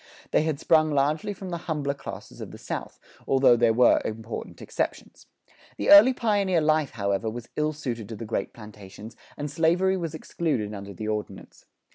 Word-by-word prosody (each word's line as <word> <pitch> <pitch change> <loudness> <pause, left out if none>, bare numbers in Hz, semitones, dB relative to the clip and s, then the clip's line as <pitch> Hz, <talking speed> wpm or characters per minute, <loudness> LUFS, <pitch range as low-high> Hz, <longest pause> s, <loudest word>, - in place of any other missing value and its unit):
They - - +3
had 155 -2 -1
sprung 155 -1 +3
largely 150 +8 0
from 190 -2 -7
the 170 - -3
humbler 145 -3 -1
classes 140 - -9
of - - -7
the - - -11
South, - - -6 0.3
although 135 -2 +5
there 120 -1 +3
were 120 +2 +4
important 110 +1 -6
exceptions. - - -5 0.5
The - - +1
early 205 +6 +10
pioneer 205 -7 +1
life, 155 -2 +2
however, 100 0 -1
was 120 +1 -8
ill 150 0 0
suited 120 -8 -5
to 115 - -6
the 115 - -7
great 110 - -3
plantations, 105 0 -12 0.2
and 145 -1 -4
slavery 175 +5 +2
was 165 -4 -4
excluded 120 -11 -2
under 100 -1 -8
the 110 +4 -5
Ordinance. 105 -1 -6
140 Hz, 175 wpm, -26 LUFS, 110-160 Hz, 0.5 s, early